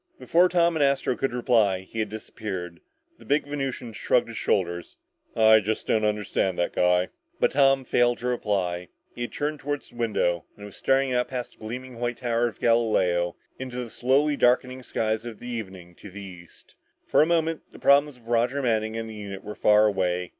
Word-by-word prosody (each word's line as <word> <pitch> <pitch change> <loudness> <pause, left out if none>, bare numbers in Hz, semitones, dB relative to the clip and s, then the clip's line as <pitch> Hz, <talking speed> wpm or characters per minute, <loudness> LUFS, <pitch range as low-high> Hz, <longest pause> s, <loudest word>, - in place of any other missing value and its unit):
Before 180 +2 +3
Tom 170 -1 +3
and 155 - 0
Astro 140 -2 +2
could 135 - -1
reply, 115 -6 +2
he 105 +4 -8
had 110 -1 -1
disappeared. 95 -5 -6 0.4
The - - -14
big 145 +1 +1
Venusian 135 -5 -4
shrugged 120 +2 +1
his 115 - -7
shoulders. 85 -2 -1 0.4
"I 110 0 +6
just 110 +1 -2
don't 110 - +1
understand 105 -3 0
that 85 - -1
guy!" 90 0 +2 0.3
But - - +3
Tom 135 -1 +4
failed 120 0 +2
to 125 - -8
reply. 95 -7 -1 0.3
He - - -8
had 120 - -3
turned 150 +1 -3
toward 145 +1 -3
the - - -18
window 95 -8 0
and 105 - -10
was 105 - -11
staring 135 -1 +1
out 125 0 +1
past 125 -2 -5
the - - -28
gleaming 120 +2 -7
white 120 0 -2
Tower 120 -1 0
of 115 - -8
Galileo 95 -7 +2 0.2
into 130 -1 -6
the 115 - -9
slowly 140 +6 +2
darkening 125 0 +2
skies 110 -2 -2
of 120 -2 -9
evening 95 -8 -7
to 105 - -11
the 100 +2 -10
east. 90 -3 -13 0.3
For - - +2
the 155 - +6
moment, 165 -1 +1
the - - -14
problems 140 0 +4
of 115 -2 -21
Roger 120 +4 +1
Manning 110 -2 0
and 115 0 -4
the 110 - -8
unit 100 -2 -7
were 105 - -6
far 105 0 +4
away. 90 -3 0
115 Hz, 195 wpm, -25 LUFS, 100-130 Hz, 0.4 s, I